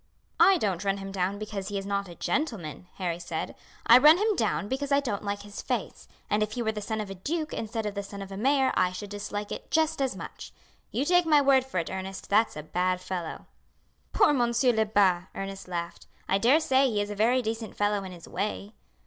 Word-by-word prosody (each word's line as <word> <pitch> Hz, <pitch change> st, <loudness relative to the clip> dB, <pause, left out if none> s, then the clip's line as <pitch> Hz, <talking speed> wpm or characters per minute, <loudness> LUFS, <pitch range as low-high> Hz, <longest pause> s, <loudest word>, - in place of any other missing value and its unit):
"I 385 Hz, -1 st, +7 dB
don't 195 Hz, -, -1 dB
run 195 Hz, 0 st, 0 dB
him 195 Hz, 0 st, -6 dB
down 195 Hz, +1 st, -1 dB
because 205 Hz, -2 st, -5 dB
he 205 Hz, 0 st, -3 dB
is 195 Hz, -, -4 dB
not 200 Hz, -1 st, -2 dB
a 170 Hz, -, -10 dB
gentleman," 190 Hz, -, -3 dB
Harry 175 Hz, -3 st, -2 dB
said. 170 Hz, -2 st, -4 dB, 0.3 s
"I 235 Hz, +2 st, +9 dB
run 305 Hz, +5 st, +8 dB
him 425 Hz, +2 st, +1 dB
down 200 Hz, -, 0 dB
because 270 Hz, +4 st, -3 dB
I 280 Hz, -, +5 dB
don't 235 Hz, -8 st, -3 dB
like 200 Hz, 0 st, -3 dB
his 205 Hz, 0 st, -8 dB
face; -, -, -4 dB, 0.2 s
and 210 Hz, -, +1 dB
if 215 Hz, 0 st, -1 dB
he 240 Hz, -, -2 dB
were 220 Hz, -, +1 dB
the 215 Hz, -1 st, -5 dB
son 220 Hz, +2 st, -3 dB
of 210 Hz, -2 st, -4 dB
a -, -, -3 dB
duke 310 Hz, -, -3 dB
instead 225 Hz, 0 st, -3 dB
of 210 Hz, -, -2 dB
the 200 Hz, -, -3 dB
son 200 Hz, 0 st, -9 dB
of 195 Hz, -, -11 dB
a -, -, -5 dB
mayor 265 Hz, +5 st, +2 dB
I 180 Hz, -, +2 dB
should 200 Hz, +2 st, -7 dB
dislike 205 Hz, 0 st, -5 dB
it -, -, -6 dB
just 315 Hz, -3 st, +1 dB
as 265 Hz, -1 st, 0 dB
much. -, -, -9 dB, 0.4 s
You 265 Hz, -, -1 dB
take 355 Hz, +1 st, +4 dB
my 300 Hz, -2 st, +6 dB
word 270 Hz, -2 st, +4 dB
for 265 Hz, -, -5 dB
it, 170 Hz, -, -1 dB
Ernest, 190 Hz, 0 st, -6 dB
that's 215 Hz, -4 st, +3 dB
a 150 Hz, -, -5 dB
bad 180 Hz, +3 st, 0 dB
fellow." 180 Hz, -3 st, -5 dB, 0.7 s
"Poor 405 Hz, -8 st, +4 dB
Monsieur 240 Hz, -1 st, +2 dB
Lebat!" 200 Hz, -5 st, +2 dB
Ernest 195 Hz, 0 st, -6 dB
laughed. 170 Hz, -1 st, -5 dB, 0.2 s
"I 195 Hz, -, +2 dB
daresay 270 Hz, +2 st, +4 dB
he 215 Hz, -3 st, -1 dB
is 205 Hz, 0 st, -2 dB
a -, -, -4 dB
very 240 Hz, +5 st, +3 dB
decent 225 Hz, 0 st, -4 dB
fellow 205 Hz, -1 st, +1 dB
in 190 Hz, -, -7 dB
his 175 Hz, -2 st, -11 dB
way. 205 Hz, +2 st, -3 dB
205 Hz, 230 wpm, -28 LUFS, 195-255 Hz, 0.7 s, I